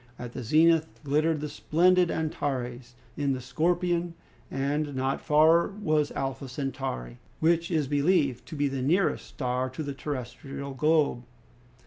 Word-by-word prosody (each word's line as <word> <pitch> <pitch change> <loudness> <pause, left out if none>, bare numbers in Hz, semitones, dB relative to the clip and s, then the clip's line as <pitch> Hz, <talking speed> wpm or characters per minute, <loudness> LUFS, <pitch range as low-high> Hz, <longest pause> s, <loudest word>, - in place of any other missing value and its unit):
At 120 -1 -7
the - - -5
zenith 160 +6 +4
glittered 155 +2 +1
the 150 - -2
splendid 180 +4 +3
Antares 125 -6 -3 0.2
in 140 -2 0
the 130 - -3
Scorpion, 170 +5 0 0.3
and 145 +1 -1
not 130 +1 -1
far 160 +3 +5
was 155 -8 0
Alpha 135 -1 -3
Centauri, 125 - -4 0.2
which 165 +1 +2
is 155 -5 0
believed 145 -3 +1
to - - -7
be 145 -1 +1
the 135 -1 -3
nearest 170 +8 +1
star 125 -1 -2
to 130 +5 -5
the 140 -1 -4
terrestrial 135 0 -6
globe. 150 -2 +2
145 Hz, 140 wpm, -27 LUFS, 130-160 Hz, 0.3 s, far